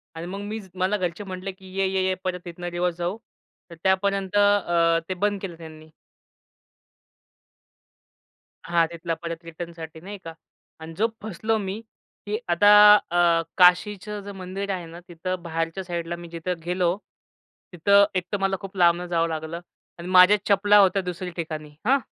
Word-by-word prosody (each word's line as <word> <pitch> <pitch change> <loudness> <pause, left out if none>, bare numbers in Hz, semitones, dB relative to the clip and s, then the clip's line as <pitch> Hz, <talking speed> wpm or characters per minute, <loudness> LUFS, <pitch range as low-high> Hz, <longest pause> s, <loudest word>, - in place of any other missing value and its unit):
आणि 165 - -6
मग 195 +2 -6
मी 210 +2 -5 0.2
मला 190 +3 0
घरचे 180 +1 -3
म्हटले 190 0 -6
की 190 0 -15
ये-ये-ये 190 -1 +1
परत 180 -1 -4
इथनं 175 +1 -7
रिवर्स 175 0 -1
जाऊ, 175 +4 -2 0.5
तर 170 - -10
त्यापर्यंत 195 0 +1
अ, 175 -5 +3
ते - - 0
बंद 205 +2 -1
केलं 175 -4 -6
त्यांनी. 155 -1 -12 2.8
हां 170 -1 +3
तिथला 170 0 -4
परत 170 0 -6
रिटर्नसाठी 165 -1 -8
नाही 200 +2 -8
का 165 - -8 0.5
आणि 160 +1 -8
जो 220 +3 +3
फसलो 220 +2 -1
मी 200 +1 -4 0.4
की 210 +1 -2
आता 205 +4 +5 0.2
अ, 170 -3 +2 0.2
काशीचं 200 +3 +3
जे 200 - -7
मंदिर 195 +1 -6
आहे 180 -2 -4
ना, 165 +1 -11
तिथं 180 +1 -4
बाहेरच्या 165 +3 -3
साईडला 170 -1 -4
मी 170 0 -10
जिथं 170 +1 -4
गेलो, 180 0 0 0.8
तिथं 200 +4 +5
एक 185 - +1
तर 205 - 0
मला 195 0 +1
खूप 195 0 -9
लांबन 175 0 +3
जावं 165 -1 +1
लागलं 160 +1 -4 0.4
आणि 170 - -7
माझ्या 185 +3 +7
चपला 205 +1 +5
होत्या 195 0 +4
दुसऱ्या 180 -1 -5
ठिकाणी. 155 -3 -5 0.2
हां 265 +4 +4
180 Hz, 155 wpm, -24 LUFS, 170-195 Hz, 2.8 s, माझ्या